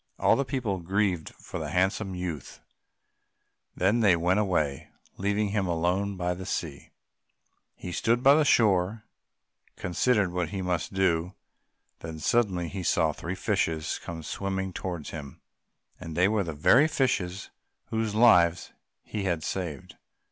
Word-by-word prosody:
All - - +4
the 140 - +1
people 125 -8 -2
grieved 95 -1 0
for - - -7
the - - -4
handsome 95 +1 0
youth; 85 -7 -5 1.2
then 100 +6 +2
they 100 -6 +5
went 90 +4 +2
away, 80 -9 -1 0.3
leaving 100 +1 0
him 100 -2 0
alone 90 +4 0
by 90 0 -1
the 90 +1 -7
sea. 80 -6 -4 0.9
He 90 - -7
stood 115 +8 0
on 140 +1 +8
the 155 - +4
shore 100 -9 +4 0.8
and - - -34
considered 100 +1 +1
what 90 -2 -2
he 95 +1 -4 0.2
should 80 - -8
do, 90 -1 +1 0.6
when 80 -1 -7
suddenly 90 0 +1
he 95 +2 -5
saw 80 -3 +2
three 85 +5 -5
fishes 80 -3 -1
come 80 -1 -7
swimming 95 +2 -3
towards 85 -5 -5
him, 70 -4 -8 0.6
and 80 0 -7
they 90 +2 +5
were 105 -1 +1
the 80 -3 -5
very 125 - +5
fishes 100 - -1 0.4
whose 110 -2 -1
lives 90 -7 +4 0.3
he 105 -2 -4
had 85 -4 -1
saved. 85 -8 -5
95 Hz, 150 wpm, -27 LUFS, 85-105 Hz, 1.2 s, on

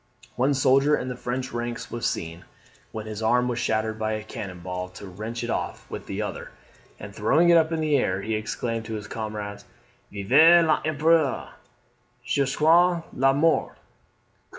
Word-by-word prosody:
One 135 +3 +2
soldier 135 +3 +4
in 130 - -4
the 125 - -4
French 125 +1 -4
ranks 120 0 -5
was 120 - -2
seen, 85 +1 -4 0.5
when 110 -1 -6
his 110 0 -6
arm 125 +3 +2
was 120 -1 -2
shattered 110 -1 -1
by 110 0 -1
a 110 0 -4
cannon 95 -4 -8
ball, 90 +1 -5
to 90 - -11
wrench 110 +5 -6
it 120 - -3
off - - -4
with - - -7
the - - -3
other; - - -6 0.5
and 100 -1 -9
throwing 145 - +3
it 170 - +7
up 160 0 0
in 160 -1 -1
the 155 -2 +2
air, 95 -7 0
he 110 - -2
exclaimed 115 +1 -3
to 110 0 -5
his 105 -1 -6
comrades, 105 -2 -6 0.5
"Vive 155 - +5
l'Empereur 155 -1 +1 0.8
jusqu'a 160 +7 +3
la 135 +1 +3
mort!" 160 +4 +1
120 Hz, 170 wpm, -25 LUFS, 110-145 Hz, 0.8 s, it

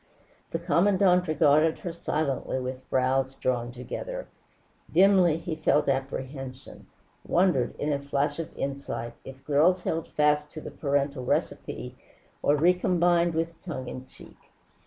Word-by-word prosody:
The - - -2
Commandante 180 0 +3
regarded 155 +1 +4
her 175 - -5
silently 150 -5 -2
with 130 0 -6
brows 130 +1 +1
drawn 120 -2 -1
together. - - -6 0.6
Dimly, 185 -2 +5
he 165 -1 -4
felt 155 -1 +2
apprehension, 135 -1 -4 0.4
wondered, 175 -9 +2
in 150 0 -1
a 140 - -1
flash 140 +3 -1
of 165 - -4
insight, 135 -4 -4
if 135 0 -11
girls 165 +6 +3
held 165 0 -2
fast 150 0 +2
to 155 - -6
the - - -8
parental 140 -2 -1
recipe, - - -2 0.5
or 145 - +3
recombined 175 0 +3
with 165 0 -2
tongue 140 -8 -5
in 130 0 -7
cheek. - - -15
150 Hz, 135 wpm, -27 LUFS, 135-170 Hz, 0.6 s, Dimly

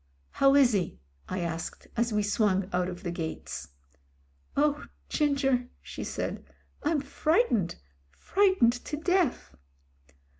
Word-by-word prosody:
"How 275 0 +4
is 265 -4 +6
he 185 -5 -1 0.2
?" - - -39
I 185 0 -2
asked, 165 -1 -4
as 235 0 +1
we 210 -1 +1
swung 200 -3 +2
out 180 0 +1
of 180 +1 -8
the 175 - -2
gates. 165 -2 -5 0.9
"Oh! 295 +1 +2 0.2
Ginger," 270 -4 +1
she - - -7
said. - - -4 0.4
"I'm 300 -1 +1
frightened 280 - +1 0.3
— - - -38
fright 380 - +2
ened 240 +1 +4
to 300 - -3
death." 355 -2 +1
245 Hz, 140 wpm, -29 LUFS, 185-295 Hz, 0.9 s, is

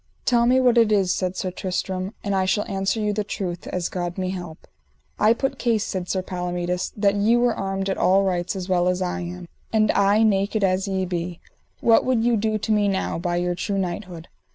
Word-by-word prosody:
Tell 235 -1 +3
me 255 +1 +4
what 250 -2 +4
it 225 -2 +4
is, 195 -3 +3
said 185 0 -2
Sir 185 - -2
Tristram, 185 +2 -3
and 200 - -1
I 190 -1 +2
shall 205 +2 +1
answer 195 +2 -1
you 210 -1 0
the 210 +1 -1
truth, 180 -3 -5
as 180 -2 -2
God 175 0 -4
me 185 -1 -2
help. 175 -4 -8 0.5
I 215 - +5
put 270 +3 -1
case, 230 -4 +1
said 180 -2 -4
Sir 185 -1 -1
Palomides, 180 0 -3
that 200 -1 +3
ye 205 +3 +3
were 240 -1 +3
armed 195 -1 -3
at 195 - -2
all 195 +2 +4
rights 180 0 -1
as 185 -1 -5
well 180 -1 +2
as 180 +1 +1
I 180 +1 -2
am, 175 0 -7 0.2
and 215 -1 +3
I 205 +2 +3
naked 205 0 +1
as 190 +1 +1
ye 190 -1 -1
be, 175 -1 -4 0.4
what 230 -1 +5
would 250 -3 +1
you 240 0 +3
do 215 0 0
to 215 +1 -3
me 210 -1 +3
now, 190 -3 -1
by 175 0 -1
your 175 0 0
true 195 +3 -2
knighthood? 180 -2 -4
195 Hz, 225 wpm, -23 LUFS, 180-215 Hz, 0.5 s, I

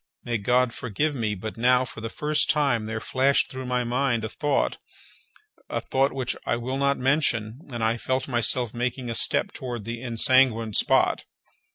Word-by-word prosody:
May 120 -2 -2
God 125 +3 +2
forgive 140 +5 -2
me, 110 -6 -2
but 110 +4 -7
now, 125 +2 +3
for 115 - -10
the 115 - -4
first 150 +5 0
time, 140 -8 +2
there 110 0 -3
flashed 135 +5 +1
through 130 -2 -6
my 125 0 0
mind 120 -1 0
a 110 - -3
thought, 145 +6 -1 0.9
a - - -1
thought 135 +1 +1
which 130 -2 -3
I - - 0
will 125 +3 -3
not 140 0 +2
mention, 125 -4 0
and 120 -2 -3
I 115 +1 +1
felt 130 +2 -2
myself 120 -1 0
making 125 0 -3
a - - -2
step - - +2
toward 120 -5 -6
the 115 0 -5
ensanguined 115 -2 +3
spot. - - +2
125 Hz, 180 wpm, -25 LUFS, 115-130 Hz, 0.9 s, now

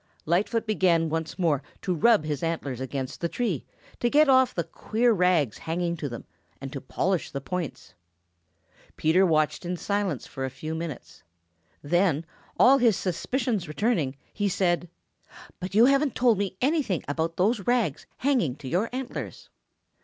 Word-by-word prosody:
Lightfoot 205 +8 +1
began 175 -6 +2
once 160 0 -3
more 160 -7 +1 0.2
to 185 - 0
rub 215 +2 +4
his 150 -3 -2
antlers 145 -6 -3
against 130 0 -4
the 170 - 0
tree 205 - -2 0.3
to 240 - +1
get 300 +3 +5
off 260 -1 +5
the 170 - 0
queer 230 +6 0
rags 175 - +2
hanging 170 +1 -2
to 150 -3 -4
them 120 - -8 0.3
and 135 +1 -7
to 140 - -5
polish 180 +6 -1
the 140 - -4
points. 175 +3 -5 1.0
Peter 180 +5 +4
watched 155 0 +1
in 180 +1 -3
silence 200 - -2
for 135 - -6
a 130 - -1
few 155 +5 -6
minutes. 160 -4 -6 0.6
Then, 170 0 +2 0.3
all 275 +2 +7
his 230 -6 +4
suspicions 205 +2 -1
returning, 155 - 0 0.2
he 205 -1 0
said: 175 -2 0 0.7
"But 185 +2 -5
you 225 +3 +7
haven't 275 +1 +3
told 235 -5 +3
me 195 -2 -2
anything 270 - +1
about 160 +3 -2
those 200 +2 +1
rags 235 - +1
hanging 245 - +1
to 145 -2 -10
your 185 - 0
antlers." 255 0 -6
180 Hz, 160 wpm, -26 LUFS, 155-225 Hz, 1.0 s, all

